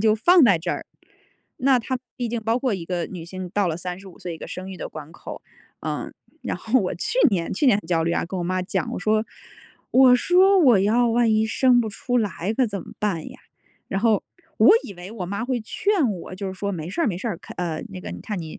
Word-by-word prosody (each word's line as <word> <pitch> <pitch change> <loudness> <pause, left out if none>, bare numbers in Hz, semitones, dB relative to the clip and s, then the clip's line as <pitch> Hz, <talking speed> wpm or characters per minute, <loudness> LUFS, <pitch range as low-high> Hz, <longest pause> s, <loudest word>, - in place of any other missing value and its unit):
就 215 0 +4
放 345 +8 +6
在 200 -8 +5
这 175 - -2
儿， - - -4 0.7
那 260 0 +4
它 260 +2 -2 0.2
毕 245 -2 -2
竟 235 0 -2
包 225 +2 +1
括 255 -5 0
一 170 -3 -5
个 175 -1 -2
女 175 -4 -8
性 185 +1 -7
到 200 -1 +1
了 160 - -2
35 180 +1 -7
岁 175 -2 -5
一 - - -11
个 - - -8
生 185 +1 -6
育 185 - -7
的 - - -6
关 155 +1 -10
口， - - -9 0.4
嗯。 - - -4 0.3
然 - - -3
后 235 +3 +1
我 185 - -2
去 340 - -2
年 175 -6 -1
去 280 - +1
年 210 -6 +5
很 210 - -9
焦 165 -1 +1
虑 170 +1 0
啊， - - 0
跟 185 +2 -5
我 175 - -2
妈 185 +1 -1
讲 185 -2 -2
我 - - -3
说， 215 +3 +1 0.6
我 255 -1 +7
说： 370 +8 +4
“我 250 - +6
要 230 +5 +3
万 235 0 +3
一 215 0 +3
生 245 +2 +3
不 220 - -3
出 245 +4 -2
来 210 -2 -1
可 260 0 +2
怎 200 -3 -4
么 - - -12
办 190 -7 -2
呀？ - - -14 0.5
"然 195 - -1
后 220 -2 +3 0.3
我 - - +7
以 200 - -8
为 180 +3 -9
我 195 -6 -5
妈 200 +5 -3
会 245 -2 -1
劝 330 - +1
我， 185 -1 -6
就 195 +1 -5
是 190 - -4
说 200 +2 -3
没 165 -3 -5
事 265 - -2
儿 - - +2
没 180 -5 -1
事 235 - -3
儿， 205 - -3
看 - - -12
呃， 170 -3 -2
那 95 - -7
个 85 -1 -7
你 90 - -7
看 205 -5 -4
你 160 -1 -8
200 Hz, 270 characters per minute, -23 LUFS, 180-240 Hz, 0.7 s, 我